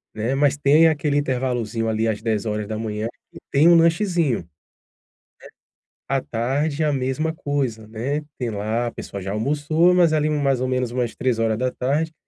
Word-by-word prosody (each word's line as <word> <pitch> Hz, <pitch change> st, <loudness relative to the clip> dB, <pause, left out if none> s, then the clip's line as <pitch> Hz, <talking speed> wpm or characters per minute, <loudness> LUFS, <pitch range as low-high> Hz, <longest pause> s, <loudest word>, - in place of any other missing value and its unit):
né, 110 Hz, +4 st, -1 dB
mas 140 Hz, 0 st, +2 dB
tem 150 Hz, +3 st, +5 dB
aquele 150 Hz, -2 st, +1 dB
intervalozinho, 125 Hz, -5 st, -1 dB
ali, 110 Hz, +1 st, 0 dB
às 110 Hz, -2 st, -1 dB
10:00, 110 Hz, 0 st, -2 dB, 0.2 s
que -, -, -13 dB
tem 145 Hz, +4 st, +5 dB
um 170 Hz, -, +7 dB
lanchezinho, 165 Hz, -, +2 dB
né. -, -, -11 dB, 1.6 s
A 135 Hz, 0 st, +1 dB
tarde 140 Hz, +7 st, -1 dB
é -, -, +2 dB
a 150 Hz, -, +1 dB
mesma 135 Hz, +4 st, -1 dB
coisa, 135 Hz, -8 st, -3 dB
né, 125 Hz, +7 st, -2 dB, 0.2 s
tem 125 Hz, -3 st, -2 dB
lá 110 Hz, +3 st, -2 dB
a -, -, -8 dB
pessoa 100 Hz, -, -7 dB
já 95 Hz, +1 st, -4 dB
almoçou, 150 Hz, -, +2 dB
mas 175 Hz, -3 st, +4 dB
ali 155 Hz, -1 st, +2 dB
mais 140 Hz, -4 st, +1 dB
ou 130 Hz, -, -1 dB
menos 125 Hz, -2 st, -1 dB
umas 120 Hz, -1 st, -2 dB
15:00 125 Hz, +6 st, 0 dB
130 Hz, 160 wpm, -22 LUFS, 115-150 Hz, 1.6 s, um